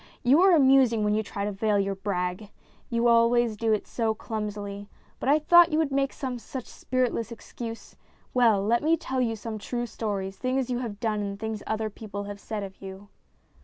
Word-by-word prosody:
You 275 +7 +5
are 380 -2 +6
amusing 265 -6 +5
when 210 0 +2
you 215 - +2
try 200 -1 -4
to 210 - -1
veil 205 +1 +1
your 195 0 0
brag. 190 0 -3 0.4
You 235 0 +1
always 235 -1 +4
do 225 +1 0
it 215 - +1
so 225 -2 -1
clumsily. 205 -2 -5 0.3
But - - -1
I 295 - +6
thought 345 +2 +6
you 305 - +1
would 315 -3 +1
make 275 0 +1
some 255 -3 -5
such 255 +1 -7
spirit 255 -1 -1
less 230 0 -4
excuse. 230 0 -8 0.4
Well, 225 -6 +4
let 235 +2 +2
me 325 +2 +3
tell 265 -4 -2
you 230 -2 0
some 220 0 -6
true 240 +3 -3
stories 200 -4 -4
things 255 0 -1
you 245 - -1
have 220 -5 -5
done 220 -3 -1
and 200 -1 -4
things 220 -1 -4
other 220 0 -2
people 205 -1 -7
have 205 0 -7
said 210 -1 -5
of 195 -1 -9
you." 195 +1 -9
225 Hz, 205 wpm, -27 LUFS, 205-250 Hz, 0.4 s, are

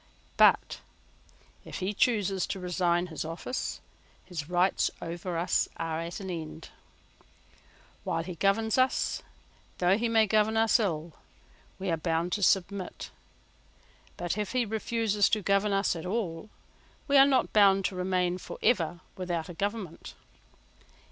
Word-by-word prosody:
But, - - +4 0.8
if - - -7
he 190 +2 -2
chooses 200 -5 +1
to 195 - -4
resign 175 -1 +1
his 155 - -3
office, 165 +10 -4 0.4
his 160 -4 -6
rights 180 +2 +2
over 170 +1 -4
us 170 +2 +1
are 165 -1 -2
at 170 +1 -5
an 190 -2 -5
end. 160 -1 -7 1.3
While 170 -4 -1
he 180 +2 -6
governs 205 +7 +1
us, 255 0 +1 0.6
though 185 +3 +3
he 235 0 0
may 225 -1 +4
govern 215 +1 +2
us 225 +2 +4
ill, 165 -6 -2 0.6
we 190 -2 -2
are 165 - +1
bound 165 +2 -1
to 205 - -1
submit: 195 0 0 1.1
but, 175 +4 -2
if 210 +2 -3
he 250 -2 +2
refuses 220 -1 +1
to 215 -2 0
govern 200 +2 +2
us 195 -2 +1
at 165 +2 -6
all, 190 -2 -3 0.6
we 285 - +2
are 275 0 +8
not 265 -2 +2
bound 195 -2 +5
to 190 - -1
remain 180 -1 0
for - - -8
ever 175 -7 +1 0.2
without 175 -2 -3
a - - -6
government. 200 -2 -4
190 Hz, 145 wpm, -29 LUFS, 175-210 Hz, 1.3 s, are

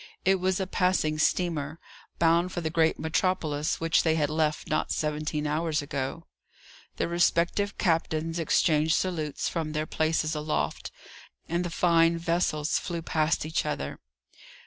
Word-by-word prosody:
It 190 0 +4
was 185 +1 0
a 190 - 0
passing 180 -5 +1
steamer, 160 -3 0 0.4
bound 170 +2 +3
for - - -3
the 160 -1 -2
great 160 -1 +2
metropolis 160 -3 0
which 165 0 +3
they 160 -1 +2
had 150 -2 0
left 155 0 0
not 155 -1 -1
seventeen 150 0 -2
hours 150 0 0
ago. 140 +3 -4 0.7
The - - 0
respective 175 +4 +1
captains 165 -1 0
exchanged 160 0 +2
salutes 160 -6 -2
from 160 -3 -3
their 155 0 -1
places 155 0 0
aloft, 150 0 -2 0.6
and 170 +2 -1
the 175 - -3
fine 165 0 +3
vessels 165 -2 0
flew 170 -2 -5
past 155 -1 0
each 155 - -1
other. 150 - -4
160 Hz, 145 wpm, -27 LUFS, 155-170 Hz, 0.7 s, It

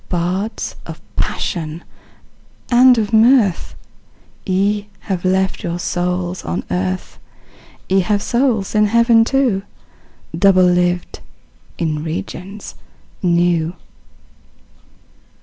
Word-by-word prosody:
Bards 185 +5 -2
of - - -8 0.2
Passion 165 -2 -3 0.9
and 250 +1 +6
of 220 0 -1
Mirth, 220 -4 +3 0.7
Ye 200 +2 0
have 185 -3 -3
left 190 +1 0
your 170 0 -3
souls 180 0 -2
on 85 +2 -3
earth! 90 +1 -3 0.7
Ye 190 +1 +3
have 205 +2 0
souls 235 -5 0
in 210 -1 +3
heaven 230 +1 +4
too, 245 -5 +1 0.7
Double 195 -2 +4
lived 180 0 0 0.6
in 155 -2 -2
regions 180 +5 -6 0.5
new! 170 -1 +1
185 Hz, 95 wpm, -18 LUFS, 175-210 Hz, 0.9 s, and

